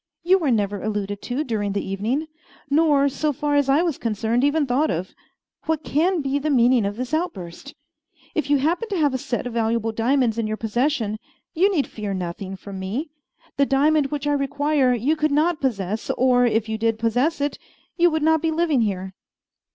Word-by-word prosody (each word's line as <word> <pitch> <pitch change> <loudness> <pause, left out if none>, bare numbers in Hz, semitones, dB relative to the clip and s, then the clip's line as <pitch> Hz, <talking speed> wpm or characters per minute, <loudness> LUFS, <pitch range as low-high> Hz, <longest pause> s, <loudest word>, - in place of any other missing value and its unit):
You 375 +3 +4
were 310 -6 0
never 205 -4 0
alluded 205 -1 -3
to 255 +5 -2
during 210 -6 -2
the 200 - -3
evening, 220 +11 -1 0.5
nor, 290 -2 +4
so 295 +2 -1
far 295 +1 -1
as 285 -1 +2
I 290 +5 +4
was 330 -6 -1
concerned, 225 +2 0
even 290 +1 +2
thought 270 +4 +1
of. 175 +3 -3 0.5
What 315 -1 0
can 330 +3 +1
be 275 +1 0
the 305 +2 -2
meaning 245 -5 +4
of 205 - -4
this 255 +4 -5
outburst? 280 - -4 0.6
If 295 -3 -2
you 290 - +4
happen 335 +11 0
to 395 - -1
have 295 -4 +2
a 260 - -1
set 245 0 -3
of 245 - -5
valuable 225 0 0
diamonds 235 0 +1
in 225 - -1
your 215 0 -3
possession, 225 -1 -1 0.3
you 375 +4 +3
need 305 -8 +1
fear 205 -3 -5
nothing 185 +2 -5
from 195 0 -9
me. 235 - -4 0.5
The 280 0 +3
diamond 290 +2 +3
which 290 0 -4
I 290 - +2
require 285 -2 +1
you 260 +7 +1
could 305 0 +1
not 310 +3 +1
possess; 215 -5 -2
or, 250 -1 +4
if 225 -1 0
you 220 0 -3
did 225 0 +1
possess 245 +9 0
it, 285 +1 -2 0.4
you 350 -1 +4
would 315 -2 -1
not 320 0 +3
be 325 - +1
living 320 -5 +1
here." 190 -3 -2
265 Hz, 200 wpm, -23 LUFS, 220-300 Hz, 0.6 s, You